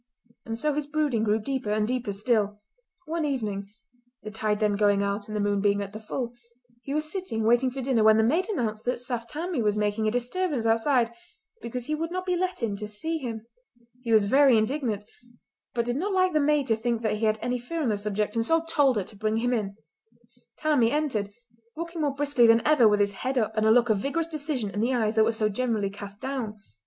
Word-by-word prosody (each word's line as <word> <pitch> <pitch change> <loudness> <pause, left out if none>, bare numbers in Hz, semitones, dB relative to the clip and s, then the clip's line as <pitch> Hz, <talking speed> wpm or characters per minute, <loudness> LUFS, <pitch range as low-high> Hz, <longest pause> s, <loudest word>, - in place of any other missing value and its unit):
And 225 0 -3
so 300 +4 0
his 295 0 -2
brooding 295 -7 0
grew 215 0 +2
deeper 260 0 -3
and 210 0 +1
deeper 250 -3 -2
still. 210 0 0 0.5
One 325 +1 -2
evening—the 220 -1 -6
tide 215 -1 -1
then 210 -2 +2
going 205 -1 +3
out 200 +1 -2
and 215 0 -4
the - - -1
moon 205 -1 +1
being 205 0 +2
at 200 0 -5
the 215 - -6
full—he 240 +2 -8
was 305 +2 0
sitting 360 - -3
waiting 240 +3 +3
for 265 +2 -5
dinner 245 -4 +2
when 220 0 +6
the 220 - +4
maid 325 - +1
announced 220 - -2
that 250 0 -1
Saft 240 -2 -4
Tammie 325 -1 -2
was 210 -1 +1
making 210 +1 0
a - - +2
disturbance 250 +2 -1
outside 230 +1 +2 0.5
because 235 +1 -5
he 305 - -2
would 325 +2 -2
not 365 +1 -4
be 365 -1 +1
let 365 -6 -2
in 210 -3 0
to 210 +1 -5
see 320 +11 -3
him. 230 -5 -5 0.6
He 235 -2 -3
was 215 -2 +5
very 265 +2 +5
indignant, 220 -2 -1 0.7
but 235 -1 0
did 245 +2 -1
not 390 +7 -1
like 370 -1 +2
the 305 - +3
maid 295 -1 +2
to 225 - +4
think 235 +1 -2
that 215 -1 0
he 220 - -1
had 215 0 +2
any 245 +2 -2
fear 315 +7 -4
on 250 - +1
the 210 - +1
subject, 210 +1 -1
and 230 - +1
so 325 +7 +2
told 285 -5 +3
her 205 - 0
to 205 - -12
bring 215 +2 -1
him 245 +2 0
in. 205 -4 -2 0.8
Tammie 295 -7 +3
entered, 270 -9 -1 0.5
walking 335 +1 -5
more 285 -2 0
briskly 280 -4 +3
than 230 0 +4
ever 300 -7 +5
with 210 -1 +3
his 200 0 +2
head 255 +7 -3
up 220 -2 0
and 215 0 +2
a - - +6
look 240 0 +4
of 210 - +2
vigorous 300 +8 -1
decision 295 -9 -3
in 205 - -4
the 250 +3 +1
eyes 220 -3 +1
that 220 -1 +4
were 230 - +2
so 220 -1 0
generally 215 -2 -1
cast 200 0 -9
down. 255 -6 -4
235 Hz, 230 wpm, -26 LUFS, 215-280 Hz, 0.8 s, when